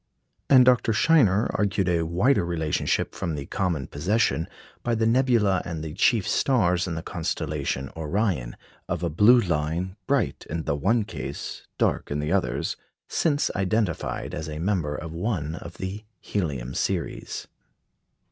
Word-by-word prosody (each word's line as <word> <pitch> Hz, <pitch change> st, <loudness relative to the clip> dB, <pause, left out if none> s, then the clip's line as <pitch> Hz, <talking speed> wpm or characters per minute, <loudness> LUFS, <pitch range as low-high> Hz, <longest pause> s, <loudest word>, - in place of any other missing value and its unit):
And 130 Hz, -2 st, +8 dB
Dr. 125 Hz, -2 st, +4 dB
Scheiner 110 Hz, -, +4 dB
argued 100 Hz, -2 st, +1 dB
a 85 Hz, -2 st, +2 dB
wider 95 Hz, +9 st, +3 dB
relationship 80 Hz, -3 st, -1 dB
from 85 Hz, -3 st, -3 dB
the 70 Hz, -1 st, -5 dB
common 85 Hz, -7 st, -1 dB
possession, 85 Hz, -, 0 dB, 0.3 s
by 120 Hz, -1 st, 0 dB
the 110 Hz, 0 st, +1 dB
nebula 115 Hz, -5 st, +3 dB
and 85 Hz, -3 st, -5 dB
the 80 Hz, -1 st, -5 dB
chief 105 Hz, +3 st, +2 dB
stars 90 Hz, -9 st, +2 dB
in 85 Hz, -, -3 dB
the 80 Hz, -, -4 dB
constellation 75 Hz, -6 st, -3 dB
Orion, 80 Hz, -, -1 dB, 0.3 s
of -, -, -2 dB
a 85 Hz, -, 0 dB
blue 110 Hz, +10 st, +6 dB
line, 85 Hz, 0 st, -1 dB
bright -, -, 0 dB
in 80 Hz, 0 st, -3 dB
the 75 Hz, -, 0 dB
one 105 Hz, +10 st, +2 dB
case, -, -, -6 dB
dark -, -, 0 dB
in 70 Hz, -, -1 dB
the 75 Hz, +2 st, -2 dB
others, 100 Hz, -1 st, 0 dB, 0.3 s
since 145 Hz, -3 st, +1 dB
identified 100 Hz, -2 st, -1 dB
as 80 Hz, 0 st, -4 dB
a 75 Hz, -, -5 dB
member 85 Hz, -4 st, 0 dB
of 80 Hz, -, -6 dB
one 85 Hz, -3 st, -2 dB
of 85 Hz, 0 st, -9 dB
the 95 Hz, +3 st, -5 dB, 0.2 s
helium 70 Hz, -10 st, -3 dB
series. -, -, -2 dB
90 Hz, 150 wpm, -25 LUFS, 80-110 Hz, 0.3 s, And